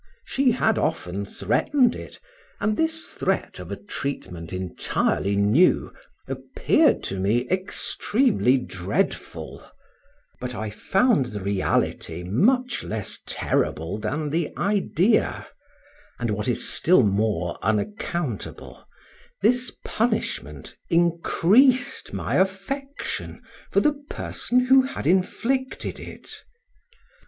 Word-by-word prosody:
She 270 -1 +2
had 225 -2 +2
often 100 - -2
threatened 230 - +1
it, - - -9 0.4
and 215 0 +1
this 320 +2 0
threat - - -1
of - - -8
a - - -2
treatment 95 - -5
entirely 95 +2 -1
new, 105 - +3 0.3
appeared - - +2
to 95 - -3
me 115 +6 +1
extremely 190 - +1
dreadful; 95 -6 -3 0.8
but 125 0 -5
I 110 -1 -4
found 195 - +2
the 105 -4 -5
reality 95 -3 -1
much 245 - +2
less 105 -2 -4
terrible 80 +6 -1
than 145 +8 -2
the 165 +1 0
idea, 200 0 +1 0.7
and 120 -3 -1
what 105 +2 -2
is 120 - 0
still 170 -6 +4
more 100 -4 0
unaccountable, 130 - -3 0.6
this 245 +2 +3
punishment 215 - -2
increased 175 +9 +3
my - - -1
affection 270 +9 -3 0.3
for - - +4
the 300 - +3 0.2
person 250 +1 0
who 265 +1 +6
had 260 - -5
inflicted 235 - 0
it. - - -10
165 Hz, 105 wpm, -24 LUFS, -, 0.8 s, who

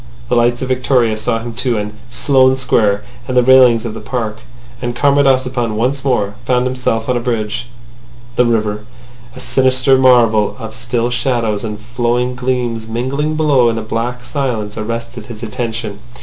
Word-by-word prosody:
The - - +2
lights 120 +1 +2
of - - -2
Victoria 125 -3 +2
saw 115 +2 -1
him 115 +1 -6
too, 120 -1 -1
and 105 0 -4 0.2
Sloane 130 +1 +3
Square, 110 -6 +1 0.2
and 130 - -1
the 125 - +6
railings 125 -3 +6
of 115 - -4
the 110 - -7
park. 110 -2 -3 0.4
And 120 -1 -3
Comrade 140 +2 +3
Ossipon 125 -4 +1
once 130 +5 -1
more 105 -7 0
found 125 0 +1
himself 125 -3 -1
on 125 - +1
a - - +1
bridge. 120 -1 -2 0.7
The 125 - +3
river, 105 -2 -1 0.5
a - - -9
sinister 130 0 +2
marvel 115 -5 +4
of 110 -3 -8
still 120 0 -2
shadows 120 -4 -1
and 105 -2 -5
flowing 120 +2 -1
gleams 125 -3 -2
mingling 135 +7 -2
below 145 -6 +3
in 115 - -2
a 110 - -3
black 120 +3 -3
silence, 120 -7 -2
arrested 115 +1 -5
his 115 -1 -9
attention. 115 -3 -4
120 Hz, 170 wpm, -16 LUFS, 110-130 Hz, 0.7 s, the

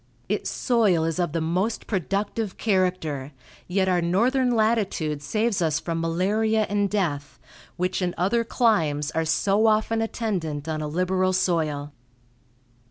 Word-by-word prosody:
Its - - -1
soil 215 - +2
is 165 +2 -2
of 175 -3 0
the 165 - -1
most 180 +8 -1
productive 200 +2 -2
character, 180 -9 -1 0.3
yet 190 +1 +1
our 180 -1 +2
northern 245 +10 +2
latitude 215 -10 0
saves 215 +7 0
us 160 -1 +1
from 165 -1 -3
malaria 210 +6 +1
and 205 0 +1
death, 150 -8 -2 0.4
which 180 +2 -1
in 175 -1 -1
other 205 +6 +1
climes 165 - +1
are 160 0 -1
so 195 +7 +2
often 220 +1 +2
attendant 180 -10 -3
on 155 -1 -2
a 150 - -3
liberal 185 +3 0
soil. 155 -6 0
185 Hz, 140 wpm, -24 LUFS, 160-215 Hz, 0.4 s, soil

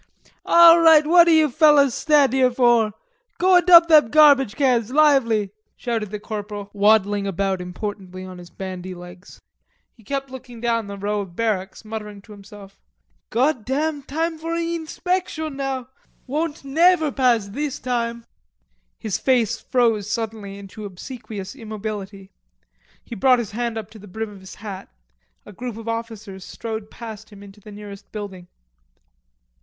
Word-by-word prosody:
"All 340 0 +8
right, 320 -2 +6
what 340 +2 +6
you 315 -2 +5
fellers 290 -2 +4
stand 290 -4 +3
here 260 -1 +3
for? 240 -3 +2 0.4
Go 370 0 +5
and 355 0 +1
dump 340 -2 +9
them 305 -8 +6
garbage 285 -5 +5
cans. 250 -6 +1
Lively!" 260 -9 +3 0.2
shouted 225 -4 -3
the 210 +1 -6
corporal 205 -1 -7
waddling 205 -1 +2
about 195 0 -1
importantly 185 0 -7
on 185 -1 -10
his 175 -1 -12
bandy 185 0 -7
legs. 180 +1 -13 0.6
He 225 - -21
kept 275 +3 -4
looking 250 -2 -10
down 230 -2 -1
the 200 0 -7
row 205 +1 -2
of 185 -4 -10
barracks, 210 -2 -3
muttering 210 -2 -7
to 215 - -16
himself, 200 -1 -14 0.5
"Goddam.... 280 +4 0
Time 320 +4 -3
fur 330 +1 -4
inspectin' 335 -1 -3
now, 270 -1 -3
goddam. - - -27 0.4
Won't 300 +2 -3
never 320 +2 +3
pass 240 -6 +1
this 285 +6 -4
time." 235 -2 -3 0.7
His 215 -4 -3
face 245 -5 +1
froze 225 -5 0
suddenly 220 -3 -4
into 200 +2 -10
obsequious 205 0 -8
immobility. 210 -4 -7 0.7
He - - -9
brought 250 +4 +3
his 235 -5 -4
hand 235 +1 -3
up 215 -1 -7
to 220 - -13
the 205 - -13
brim 220 +3 -5
of 200 - -13
his 190 0 -12
hat. 200 -3 -9 0.6
A - - -12
group 240 +2 -7
of 225 0 -10
officers 225 -4 -6
strode 220 0 -7
past 220 -2 -10
him 205 -2 -14
into 200 +1 -14
the 210 - -13
nearest 205 -1 -11
building. 195 -4 -8
225 Hz, 155 wpm, -22 LUFS, 205-275 Hz, 0.7 s, dump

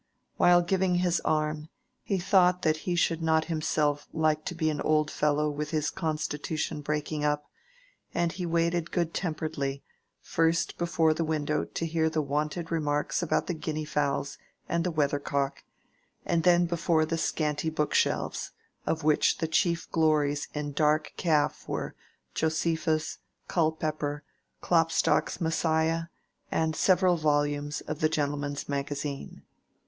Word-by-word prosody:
While 175 0 +6
giving 185 0 +1
his 175 -1 +2
arm, 155 0 -1 0.3
he 195 - -1
thought 180 0 +3
that 155 -1 +3
he 175 - +1
should 165 -1 +1
not 160 -1 +2
himself 155 -3 0
like 155 -1 +1
to 175 - -4
be 160 -1 +1
an 150 - -3
old 155 -1 +2
fellow 150 0 +1
with 150 0 -3
his 155 -2 0
constitution 155 -2 -2
breaking 150 +1 -2
up; 150 0 0 0.7
and 170 -1 0
he 180 0 -4
waited 170 0 +1
good 170 -2 -1
temperedly, 155 -5 -3 0.4
first 165 0 0
before 165 -2 +2
the 165 +1 -1
window 155 -1 0
to 165 - -4
hear 160 -1 +1
the 155 -1 0
wonted 150 +4 -2
remarks 150 -1 0
about 175 - +1
the 180 - -2
guinea 155 -1 -3
fowls 140 -1 -1 0.3
and 170 0 0
the 180 - 0
weather 145 -3 +1
cock, 140 -1 -2 0.6
and 170 - +1
then 175 0 +5
before 170 -2 +1
the 165 +1 -2
scanty 150 0 0
book 150 -1 -1
shelves, - - 0 0.3
of 160 -1 0
which 155 0 +3
the 165 - -1
chief 170 +1 +1
glories 150 -3 +2
in 150 0 -3
dark 150 +1 +1
calf 155 -4 +1
were - - -3 0.4
Josephus, 160 0 0 0.3
Culpepper, 155 -3 -1 0.4
Klopstock's 165 0 +2
"Messiah," 160 0 +1 0.5
and 160 -1 0
several 185 -1 +4
volumes 145 -1 0
of 155 - -5
the 155 - +3
"Gentleman's 145 -2 -2
Magazine." 140 0 -4
155 Hz, 145 wpm, -28 LUFS, 150-165 Hz, 0.7 s, While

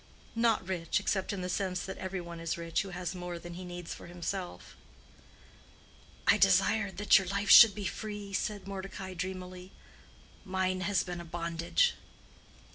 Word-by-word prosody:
"Not 230 -5 +2
rich, 175 -3 0
except 190 -2 -1
in 200 -2 -4
the 180 - -3
sense 185 -1 -1
that 190 - -6
every 190 0 -3
one 170 -1 -8
is 165 0 -2
rich 165 -1 -1
who 195 - -6
has 180 -1 -4
more 180 -1 -5
than 175 +1 -9
he 180 +2 -7
needs 175 -1 -6
for - - -11
himself." 175 +1 -5 1.5
"I - - +5
desired 200 -3 +3
that 205 0 +6
your 190 - -5
life 200 +2 0
should 225 -4 +10
be 205 -2 -5
free," 205 -1 -5
said 200 0 -2
Mordecai, 190 -1 -6
dreamily—"mine 185 0 -6
has 195 +1 +1
been 175 -1 -5
a - - -9
bondage." 170 - +1
185 Hz, 160 wpm, -31 LUFS, 175-195 Hz, 1.5 s, should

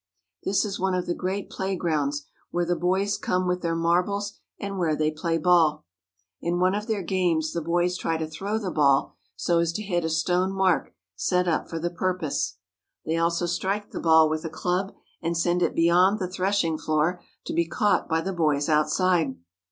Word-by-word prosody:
This 195 +2 +1
is 200 -1 -4
one 190 0 +1
of 180 - -1
the 175 - -1
great 190 +3 -3
play 190 0 -2
grounds, 145 -5 -1 0.2
where 175 0 0
the 175 +1 +1
boys 190 +4 0
come 185 0 0
with 180 0 0
their 165 -1 -1
marbles 180 +5 +1 0.3
and 200 -1 -4
where 160 -3 +1
they 155 0 +1
play 165 +1 -1
ball. 165 - +3 0.6
In 170 +1 -1
one 185 +1 +3
of 210 +2 -3
their 215 -4 -1
games 170 -3 0
the 170 - -2
boys 175 +2 0
try 165 -1 -1
to 160 - -2
throw 195 +7 -3
the 200 -5 -3
ball 140 -3 +3 0.2
so 170 -1 +1
as 170 -1 +1
to 215 - -3
hit 175 -4 -1
a 160 - -1
stone 180 +4 +1
mark 190 -3 +1 0.2
set 180 - +1
up 165 - 0
for 165 - -4
the 170 +1 -2
purpose. 160 - -2 0.5
They 160 +1 0
also 170 +1 +1
strike 195 +4 -2
the - - -5
ball 160 -1 +5
with 155 0 -2
a 165 - -3
club 180 +5 -2 0.3
and 170 0 -1
send 175 +1 +1
it - - +1
beyond 175 +4 +4
the 185 -4 -2
threshing 185 -3 0
floor 155 +3 0 0.2
to - - -4
be 170 -1 +1
caught 205 +4 +1
by 160 0 +1
the 195 +3 -3
boys 150 -4 +1
outside. 155 -1 +2
175 Hz, 200 wpm, -25 LUFS, 160-185 Hz, 0.6 s, ball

